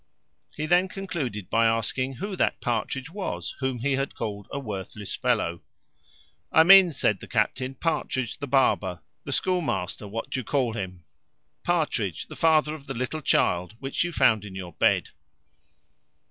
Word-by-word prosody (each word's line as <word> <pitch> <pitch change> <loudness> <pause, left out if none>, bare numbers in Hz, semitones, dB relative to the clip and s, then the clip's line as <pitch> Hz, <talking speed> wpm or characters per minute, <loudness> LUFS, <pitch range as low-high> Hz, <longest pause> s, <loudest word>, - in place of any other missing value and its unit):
He 155 - -2
then 175 +4 +4
concluded 155 - -4
by 115 0 +3
asking, 115 +4 0
"who 200 - -4
that - - +1
Partridge 125 +5 -2
was, 100 - -4
whom 130 -2 -1
he 140 +4 -1
had 135 +1 -1
called 100 -3 -5
a - - -3
worthless 105 -4 -6
fellow?" 85 0 0 0.9
"I 160 - +7
mean," 190 0 +9
said 105 - +1
the - - -10
captain, 130 +4 0
"Partridge 130 -5 -2
the 145 - -4
barber, 100 -10 +2 0.2
the - - -4
schoolmaster, 145 - -1
what 115 +3 -5
do - - -1
you - - -4
call 125 -1 0
him? 90 -5 -5 0.6
Partridge, 150 - 0
the - - -8
father 155 -2 +3
of 145 -3 -10
the 135 - -4
little 130 +6 -3
child 90 -6 +1
which 135 +4 -1
you 175 - -2
found 110 - +3
in 100 -2 -9
your 90 -2 -7
bed." - - +2
130 Hz, 160 wpm, -26 LUFS, 105-155 Hz, 0.9 s, mean